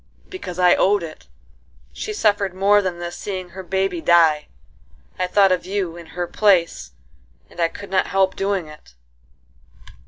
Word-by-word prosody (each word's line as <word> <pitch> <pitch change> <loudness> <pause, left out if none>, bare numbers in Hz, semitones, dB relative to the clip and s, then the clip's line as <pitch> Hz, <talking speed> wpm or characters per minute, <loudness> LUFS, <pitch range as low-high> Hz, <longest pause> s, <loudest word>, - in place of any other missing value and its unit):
"Because 195 - -7
I 180 -1 +5
owed 200 -1 +2
it;—she 165 - -11
suffered 205 - 0
more 200 +2 +4
than 185 -3 -3
this 175 0 -6
seeing 185 -3 -6
her 190 +2 -9
baby 190 -2 -2
die;—I 160 - 0
thought 195 +1 +4
of 185 - +1
you 190 -4 -2
in 170 -1 -11
her 175 - -1
place, 170 - +1 0.6
and - - -15
I 165 - +4
could 200 +3 -11
not 190 - +2
help 190 -1 +1
doing 195 -4 -1
it." 150 - -15
185 Hz, 150 wpm, -21 LUFS, 170-195 Hz, 0.6 s, I